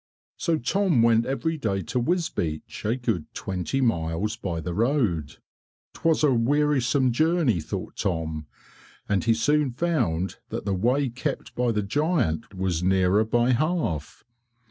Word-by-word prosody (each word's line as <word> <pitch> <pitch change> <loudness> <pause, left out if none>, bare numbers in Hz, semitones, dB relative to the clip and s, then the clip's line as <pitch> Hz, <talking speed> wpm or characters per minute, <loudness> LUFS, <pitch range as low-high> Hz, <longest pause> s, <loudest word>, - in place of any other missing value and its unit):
So 165 -3 0
Tom 165 - +2
went 115 0 +4
every 160 +4 -1
day 100 -6 -1
to 125 - -2
Wisbeach 120 - -2
a 110 +3 +2
good 115 -10 -2
twenty 95 +8 -2
miles 95 -1 0
by 90 -8 -4
the 85 +2 -4
road. 105 - 0 0.6
'T - - -14
was 165 -1 +3
a 145 -3 +5
wearisome 135 +1 +2
journey 155 - +2
thought 75 - -6
Tom 80 -4 -2 0.6
and 100 -2 +1
he 115 -1 +4
soon 145 +5 +2
found 120 - -1
that - - -5
the 100 - 0
way 125 +8 +1
kept 120 +2 -4
by 125 -1 +1
the 105 -2 0
giant 115 - 0
was 90 -3 -1
nearer 95 +2 +3
by 120 +3 +2
half. 135 - -1
115 Hz, 145 wpm, -25 LUFS, 95-145 Hz, 0.6 s, a